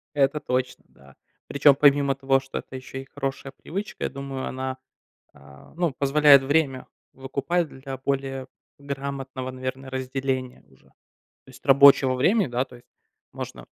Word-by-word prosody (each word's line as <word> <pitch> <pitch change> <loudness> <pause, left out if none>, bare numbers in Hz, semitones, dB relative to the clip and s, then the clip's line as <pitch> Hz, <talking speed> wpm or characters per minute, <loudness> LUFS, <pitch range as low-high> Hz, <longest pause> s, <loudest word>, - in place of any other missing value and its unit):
Это 140 +1 +2
точно, 125 -1 -2
да. 70 0 -20 0.3
Причем, 140 0 +5
помимо 140 -1 +4
того, 135 0 +2
что 135 0 -6
это 130 - -11
еще 130 +1 -7
и - - -12
хорошая 135 0 -5
привычка, 195 +9 -6
я - - -1
думаю, 135 -1 -6
она, 130 0 -4 0.6
а, 70 0 -17
ну, 170 -5 0
позволяет 140 -1 +6
время 140 -2 0 0.3
выкупать 140 +6 -2
для 135 0 -8
более 135 0 -3 0.3
грамотного, 135 -2 -5
наверно, 130 +1 -6
разделения 130 -1 -3
уже. - - -25
То - - -34 0.4
есть 130 - -16
рабочего 135 -1 +6
времени, 190 - +2
да. 125 +1 -1
То 125 - -15
есть 120 - -23 0.5
можно, - - -8
135 Hz, 150 wpm, -25 LUFS, 130-140 Hz, 0.6 s, позволяет